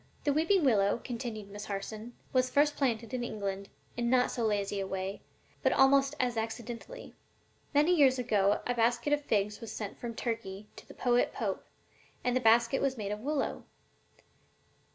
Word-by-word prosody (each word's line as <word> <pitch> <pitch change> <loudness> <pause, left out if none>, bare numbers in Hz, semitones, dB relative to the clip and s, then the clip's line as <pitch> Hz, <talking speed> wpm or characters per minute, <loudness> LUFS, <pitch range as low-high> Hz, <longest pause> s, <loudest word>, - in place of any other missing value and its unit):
] - - -33
"The 290 - +2
weeping 325 +3 +3
willow," 205 -3 +3
continued 230 -5 -5
Miss 205 +1 -7
Harson, 215 +4 -5 0.2
"was 255 -1 +3
first 295 +1 +3
planted 235 -3 -1
in 250 -1 -1
England 200 -3 -4 0.3
in 235 0 0
not 250 0 +3
so 235 - -2
lazy 205 -2 0
a 195 - -2
way, 190 +1 -4 0.4
but - - +3
almost 275 +1 +4
as 245 -3 0
accidentally. 235 - -5 0.6
Many 300 +5 +4
years 270 -5 +5
ago 210 -5 +2
a 245 - 0
basket 235 +4 +1
of 295 - +2
figs 210 -3 0
was 225 -2 -6
sent 210 -2 -6
from 235 -1 -5
Turkey 210 -4 -4
to - - -13
the - - -13
poet 245 -1 +2
Pope, - - -3 0.6
and 250 0 +1
the - - +3
basket 235 +2 +4
was 270 -2 0
made 205 -2 -3
of 210 - -3
willow. 285 +4 -2
235 Hz, 175 wpm, -31 LUFS, 210-265 Hz, 0.6 s, years